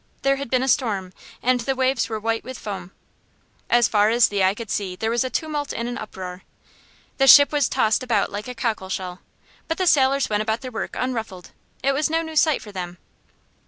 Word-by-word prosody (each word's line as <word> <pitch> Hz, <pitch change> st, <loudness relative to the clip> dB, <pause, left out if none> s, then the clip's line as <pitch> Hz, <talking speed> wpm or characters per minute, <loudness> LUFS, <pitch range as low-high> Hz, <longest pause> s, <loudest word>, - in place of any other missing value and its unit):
There 275 Hz, 0 st, +3 dB
had 280 Hz, -2 st, -6 dB
been 255 Hz, +1 st, +1 dB
a -, -, -1 dB
storm, 200 Hz, -8 st, 0 dB, 0.3 s
and 255 Hz, 0 st, +3 dB
the 265 Hz, +3 st, -1 dB
waves 260 Hz, -2 st, +1 dB
were 220 Hz, -1 st, -3 dB
white 225 Hz, +1 st, -1 dB
with 260 Hz, -1 st, -8 dB
foam. 190 Hz, -3 st, -7 dB, 0.8 s
As 240 Hz, -1 st, +4 dB
far 210 Hz, 0 st, +3 dB
as 235 Hz, +1 st, +4 dB
the 200 Hz, -2 st, 0 dB
eye 190 Hz, +1 st, +3 dB
could 225 Hz, -2 st, -7 dB
see 190 Hz, -3 st, -2 dB
there 220 Hz, +4 st, -2 dB
was 235 Hz, +1 st, +1 dB
a 260 Hz, -, -3 dB
tumult 295 Hz, 0 st, -3 dB
and 235 Hz, -, -3 dB
an 245 Hz, -1 st, -4 dB
uproar. 185 Hz, -3 st, -7 dB, 0.8 s
The 270 Hz, -, +4 dB
ship 285 Hz, +1 st, +9 dB
was 290 Hz, -3 st, +1 dB
tossed 220 Hz, +3 st, +2 dB
about 235 Hz, -5 st, 0 dB
like 205 Hz, +3 st, -5 dB
a 250 Hz, -, -6 dB
cockle 225 Hz, -5 st, -2 dB
shell. 185 Hz, -1 st, -4 dB, 0.5 s
But 325 Hz, -, -2 dB
the 370 Hz, -, 0 dB
sailors 275 Hz, -4 st, +3 dB
went 210 Hz, -1 st, 0 dB
about 220 Hz, +1 st, -1 dB
their 255 Hz, -, -7 dB
work 225 Hz, -, -5 dB
unruffled. 225 Hz, -8 st, -4 dB, 0.3 s
It 275 Hz, -, +3 dB
was 290 Hz, +3 st, 0 dB
no 325 Hz, +1 st, 0 dB
new 320 Hz, -1 st, -8 dB
sight 310 Hz, -1 st, +3 dB
for 210 Hz, -, -10 dB
them. 180 Hz, -2 st, -6 dB
235 Hz, 220 wpm, -23 LUFS, 205-270 Hz, 0.8 s, ship